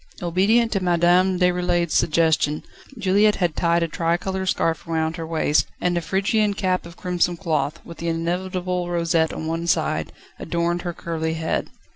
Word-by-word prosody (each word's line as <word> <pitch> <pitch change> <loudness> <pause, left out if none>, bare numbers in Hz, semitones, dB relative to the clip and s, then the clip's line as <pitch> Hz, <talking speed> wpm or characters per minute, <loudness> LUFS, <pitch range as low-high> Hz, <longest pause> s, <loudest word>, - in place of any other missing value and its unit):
Obedient 205 +7 +2
to 195 - +1
Madame 180 +1 +3
Déroulède's 180 -2 +1
suggestion, 155 -2 +2 0.3
Juliette 210 +1 +3
had 175 -4 0
tied 170 0 +2
a - - 0
tricolour 175 +4 -1
scarf 165 -3 0
round 160 0 -1
her 165 -1 -5
waist, 150 -3 +1
and 180 0 0
a 175 - 0
Phrygian 200 +4 +1
cap 185 -3 -1
of 170 - -14
crimson 180 -1 0
cloth, 155 -5 -1
with 170 - -11
the 170 - -4
inevitable 180 +2 -2
rosette 165 -2 +1
on 160 - -5
one 165 +1 -2
side, - - 0 0.3
adorned 170 +1 -1
her 175 -1 -4
curly 160 -1 -3
head. 160 0 -2
175 Hz, 160 wpm, -22 LUFS, 165-185 Hz, 0.3 s, Madame